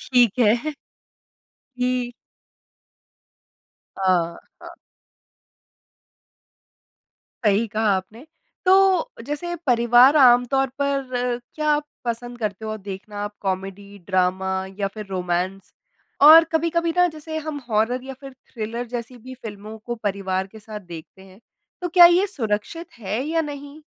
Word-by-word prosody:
ठीक 245 Hz, -4 st, +2 dB
है। 240 Hz, +6 st, +2 dB, 1.0 s
कि 250 Hz, -1 st, -1 dB, 1.8 s
अ, -, -, -9 dB, 0.6 s
हाँ। -, -, -9 dB, 2.8 s
सही 210 Hz, +2 st, +3 dB
कहा 215 Hz, 0 st, 0 dB
आपने। 220 Hz, +9 st, -8 dB, 0.4 s
तो 380 Hz, -1 st, +4 dB
जैसे 345 Hz, +4 st, -4 dB
परिवार 245 Hz, +3 st, +5 dB
आमतौर 255 Hz, 0 st, +5 dB
पर 255 Hz, -3 st, -1 dB, 0.2 s
क्या 305 Hz, -1 st, -2 dB
आप 295 Hz, 0 st, +1 dB, 0.2 s
पसंद 240 Hz, +1 st, -4 dB
करते 215 Hz, -1 st, -4 dB
हो 215 Hz, 0 st, -4 dB
देखना 200 Hz, +1 st, -8 dB
आप 205 Hz, 0 st, -6 dB
कॉमेडी, 195 Hz, +1 st, -5 dB
ड्रामा 185 Hz, +1 st, 0 dB, 0.3 s
या 200 Hz, -1 st, 0 dB
फिर 215 Hz, -2 st, -7 dB
रोमांस? 185 Hz, +1 st, -3 dB, 0.5 s
और 315 Hz, +3 st, +10 dB
कभी-कभी 335 Hz, +1 st, +1 dB
ना 360 Hz, 0 st, +5 dB
जैसे 315 Hz, 0 st, -7 dB
हम 310 Hz, -1 st, -5 dB
हॉरर 225 Hz, +3 st, 0 dB
या 270 Hz, 0 st, -7 dB
फिर 275 Hz, -1 st, -10 dB, 0.2 s
थ्रिलर 230 Hz, +2 st, -4 dB
जैसी 240 Hz, +1 st, -6 dB
भी 255 Hz, +3 st, -10 dB
फ़िल्मों 210 Hz, 0 st, -8 dB
को 240 Hz, +2 st, -5 dB
परिवार 190 Hz, -2 st, -1 dB
के 220 Hz, +3 st, -14 dB
साथ 215 Hz, 0 st, -9 dB
देखते 175 Hz, 0 st, -12 dB
हैं, 190 Hz, +2 st, -17 dB, 0.4 s
तो 355 Hz, -, -1 dB
क्या 345 Hz, 0 st, +8 dB
ये 355 Hz, +3 st, +4 dB
सुरक्षित 285 Hz, -, -4 dB
है 215 Hz, +3 st, -3 dB
या 325 Hz, +2 st, 0 dB
नहीं? 290 Hz, 0 st, -8 dB
240 Hz, 125 wpm, -22 LUFS, 205-290 Hz, 2.8 s, और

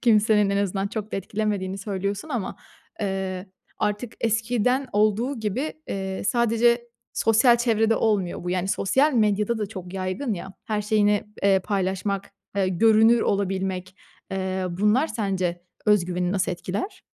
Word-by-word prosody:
kimsenin 215 Hz, -3 st, +4 dB
en 200 Hz, -, +1 dB
azından 195 Hz, 0 st, 0 dB
çok 215 Hz, 0 st, -5 dB
da -, -, 0 dB
etkilemediğini 195 Hz, -1 st, -2 dB
söylüyorsun. 200 Hz, +5 st, -3 dB
Ama, 235 Hz, -9 st, -3 dB, 0.4 s
eee, 190 Hz, -2 st, -2 dB, 0.3 s
artık 210 Hz, +3 st, -1 dB
eskiden 240 Hz, +4 st, +1 dB
olduğu 215 Hz, +5 st, +1 dB
gibi, 235 Hz, +8 st, -2 dB, 0.2 s
eee, 190 Hz, -1 st, -3 dB
sadece 235 Hz, +1 st, +2 dB, 0.2 s
sosyal 230 Hz, +2 st, +4 dB
çevrede 225 Hz, -2 st, +2 dB
olmuyor 200 Hz, -6 st, 0 dB
bu. 180 Hz, -, -2 dB
Yani, 185 Hz, +1 st, -1 dB
sosyal 270 Hz, +10 st, +2 dB
medyada 215 Hz, 0 st, +2 dB
da 210 Hz, -, -1 dB
çok 185 Hz, -3 st, -8 dB
yaygın 195 Hz, +5 st, -2 dB
ya, 190 Hz, +2 st, -7 dB
her 210 Hz, -1 st, -1 dB
şeyini, 210 Hz, -1 st, +2 dB, 0.2 s
eee, 195 Hz, -1 st, +5 dB
paylaşmak, 195 Hz, 0 st, -2 dB, 0.3 s
eee, 190 Hz, -1 st, +2 dB
görünür 225 Hz, +4 st, +5 dB
olabilmek, 190 Hz, -2 st, -1 dB, 0.3 s
eee, 190 Hz, -1 st, -2 dB
bunlar 210 Hz, -, +2 dB
sence 185 Hz, -, -2 dB, 0.2 s
öz 210 Hz, -4 st, +4 dB
güveni 180 Hz, 0 st, -1 dB
nasıl 190 Hz, -2 st, 0 dB
etkiler? 190 Hz, -, -5 dB
205 Hz, 140 wpm, -24 LUFS, 190-225 Hz, 0.4 s, eee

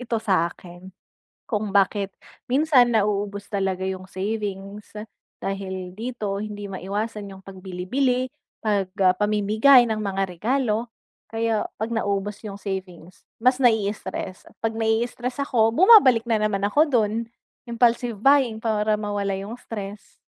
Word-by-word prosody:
ito 240 Hz, -2 st, -2 dB
sa 190 Hz, -6 st, +1 dB
akin 175 Hz, +1 st, -13 dB, 0.6 s
kung 210 Hz, -2 st, -2 dB
bakit 200 Hz, 0 st, +2 dB, 0.4 s
minsan 265 Hz, -3 st, +4 dB
nauubos 205 Hz, -1 st, 0 dB
talaga 190 Hz, -2 st, -1 dB
yung 190 Hz, -1 st, -4 dB
savings. 200 Hz, 0 st, -5 dB, 0.5 s
Dahil 190 Hz, -2 st, -5 dB
dito 215 Hz, -3 st, -4 dB
hindi 205 Hz, -1 st, -6 dB
maiwasan 200 Hz, +2 st, -4 dB
yung 190 Hz, 0 st, -13 dB
pag 195 Hz, -, -9 dB
bilibili 245 Hz, +8 st, 0 dB, 0.3 s
pag 200 Hz, -4 st, 0 dB, 0.3 s
pamimigay 215 Hz, +5 st, +5 dB
ng 220 Hz, -1 st, -2 dB
mga 195 Hz, -1 st, -1 dB
regalo, 230 Hz, +4 st, -1 dB, 0.4 s
kaya 225 Hz, -1 st, 0 dB, 0.2 s
pag 225 Hz, +2 st, -2 dB
naubos 205 Hz, -2 st, -2 dB
yung 200 Hz, -2 st, -7 dB
savings, 185 Hz, -3 st, -7 dB, 0.2 s
mas 255 Hz, +3 st, +2 dB
nai-stress. 205 Hz, -4 st, 0 dB
Kapag 225 Hz, 0 st, -3 dB
nai-stress 235 Hz, +3 st, -1 dB
ako 235 Hz, -5 st, +2 dB
bumabalik 260 Hz, -, +6 dB
na 225 Hz, -2 st, +1 dB
naman 200 Hz, -2 st, +1 dB
ako 295 Hz, +9 st, +3 dB
dun, 220 Hz, -5 st, +2 dB, 0.6 s
impulsive 235 Hz, -1 st, +1 dB
buying 265 Hz, -1 st, +4 dB
para 215 Hz, -1 st, 0 dB
mawala 205 Hz, -1 st, -2 dB
yung 200 Hz, +4 st, -6 dB
stress. 210 Hz, -4 st, -8 dB
210 Hz, 125 wpm, -24 LUFS, 195-230 Hz, 0.6 s, bumabalik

